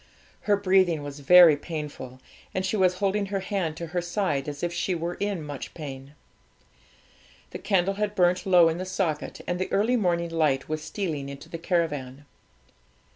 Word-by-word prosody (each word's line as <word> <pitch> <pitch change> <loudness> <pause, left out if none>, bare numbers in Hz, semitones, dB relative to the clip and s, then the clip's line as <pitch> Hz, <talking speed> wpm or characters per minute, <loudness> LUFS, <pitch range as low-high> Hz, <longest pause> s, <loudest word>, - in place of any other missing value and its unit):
Her 205 - +5
breathing 185 -5 +2
was 145 0 -7
very 170 +1 +8
painful, 145 -5 -7 0.4
and 185 0 0
she 190 - -1
was 185 -3 +3
holding 200 +1 0
her 195 0 -2
hand 185 -5 -2
to 170 - -5
her 175 - 0
side, 175 -6 -1
as 145 +2 -7
if 175 0 -1
she 180 +1 -1
were 170 +1 -3
in 200 -5 -2
much 145 -2 -7
pain. 140 -2 -8 1.4
The - - -6
candle 195 -1 +1
had 210 +1 -2
burnt 180 0 +2
low 180 -3 +6
in 165 +1 -1
the 185 - -3
socket, 185 -5 -3
and 180 0 -2
the 185 - -3
early 220 +5 +2
morning 170 -5 0
light 155 -5 +1
was 155 0 -3
stealing 155 -6 -4
into 140 0 -10
the 165 - -6
caravan. 145 -6 -2
175 Hz, 180 wpm, -26 LUFS, 150-190 Hz, 1.4 s, very